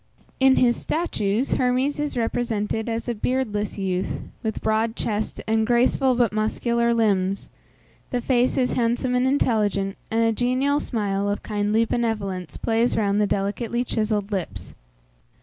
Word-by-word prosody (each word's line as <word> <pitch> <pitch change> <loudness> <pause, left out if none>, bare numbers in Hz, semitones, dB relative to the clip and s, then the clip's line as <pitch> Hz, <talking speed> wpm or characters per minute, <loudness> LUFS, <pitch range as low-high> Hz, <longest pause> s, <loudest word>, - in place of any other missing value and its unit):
In 265 0 +6
his 240 -1 +3
statues, 245 - -1
Hermes 255 +4 +1
is 295 -3 -2
represented 225 -1 -1
as 230 +1 -3
a 240 - 0
beardless 215 -3 -1
youth, 190 -2 -2 0.2
with 220 -1 -3
broad 220 +1 0
chest 215 -1 -2
and 220 0 +1
graceful 250 +2 +3
but 235 -4 +2
muscular 235 +2 +1
limbs; 200 -4 +1 0.6
the 250 - -1
face 245 0 +1
is 255 -2 +2
handsome 245 +1 0
and 250 +1 +2
intelligent, 210 -7 +1
and 225 +1 +1
a 225 - +3
genial 255 +5 +1
smile 205 -5 -1
of 205 - -2
kindly 210 +1 +1
benevolence 200 -8 -2
plays 230 +2 +1
round 205 -1 +2
the 205 - +2
delicately 215 +5 -1
chiselled 215 -3 -1
lips. 165 - -4
225 Hz, 145 wpm, -24 LUFS, 205-245 Hz, 0.6 s, In